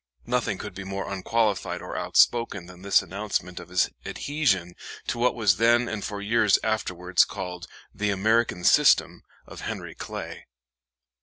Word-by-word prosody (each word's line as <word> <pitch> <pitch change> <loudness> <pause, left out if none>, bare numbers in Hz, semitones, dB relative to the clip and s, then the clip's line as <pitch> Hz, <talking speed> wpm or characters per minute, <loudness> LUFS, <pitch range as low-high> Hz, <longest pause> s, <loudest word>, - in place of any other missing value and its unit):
Nothing 120 -5 -1
could 105 0 -7
be 95 - -7
more 95 0 -5
unqualified 105 +2 -1
or - - -7
outspoken 115 -6 +2
than 90 0 -13
this 100 0 +3
announcement 95 -1 -4
of 85 0 -11
his 90 +1 +1
adhesion 100 - -1 0.3
to 120 - -3
what 125 +1 +2
was 105 -5 +3
then 120 +2 +4
and 110 -3 -4
for 105 - -4
years 110 -2 +3
afterwards 90 -5 +1
called 90 -3 -6 0.3
"the 105 +1 -1
American 105 -1 +1
System" - - +4 0.2
of - - -11
Henry - - -5
Clay. - - -7
100 Hz, 150 wpm, -26 LUFS, 90-115 Hz, 0.3 s, then